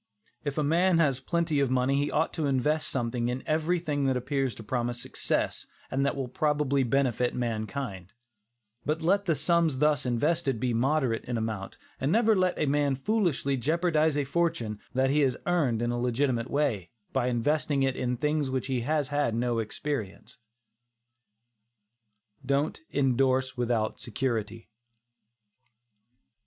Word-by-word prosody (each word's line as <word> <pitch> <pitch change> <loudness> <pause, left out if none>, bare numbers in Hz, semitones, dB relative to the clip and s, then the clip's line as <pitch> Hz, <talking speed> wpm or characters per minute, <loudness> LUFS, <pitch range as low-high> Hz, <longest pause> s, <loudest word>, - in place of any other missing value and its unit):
If 145 -1 -3
a 150 - +2
man 170 +4 +3
has 140 -6 +2
plenty 165 +1 0
of 140 -2 +2
money 130 +1 +2
he 145 - -1
ought 160 +2 0
to 155 -3 -1
invest 145 +4 +1
something 120 -1 -1
in 125 +1 -3
everything 155 -2 0
that 130 -1 +2
appears 135 0 -1
to 110 - -10
promise 120 +1 -2
success - - -2 0.2
and 135 +1 +1
that 140 - +1
will 135 -2 -3
probably 145 +1 +1
benefit 125 -1 +1
mankind; 110 -4 -3 0.7
but 155 +2 -1
let 200 +4 +2
the 165 -4 +2
sums 160 -1 +2
thus 150 0 +2
invested 135 +1 0
be 125 0 0
moderate 130 -1 +1
in 120 -1 -2
amount, 110 -3 -4 0.2
and 135 +4 0
never 225 +1 +4
let 185 -1 +1
a - - +1
man 145 -1 +2
foolishly 150 -5 0
jeopardize 155 +2 +1
a 145 - +2
fortune 135 -8 -1 0.2
that 135 +1 +3
he 150 - +3
has 135 -4 +2
earned 140 -10 +1
in 120 - 0
a 120 - -2
legitimate 125 -1 0
way, 135 - 0 0.2
by 130 -2 +1
investing 140 +3 +1
it 135 -1 +1
in 125 -1 -1
things 150 +1 0
in 130 - -3
which 130 - -1
he 130 -2 -1
has 145 +2 0
had 145 -6 0
no 120 0 0
experience. 110 -2 -5 2.0
DON'T 140 - 0
INDORSE 130 -1 +1
WITHOUT 120 -3 -1
SECURITY. 115 -3 -3
135 Hz, 155 wpm, -28 LUFS, 120-150 Hz, 2.0 s, never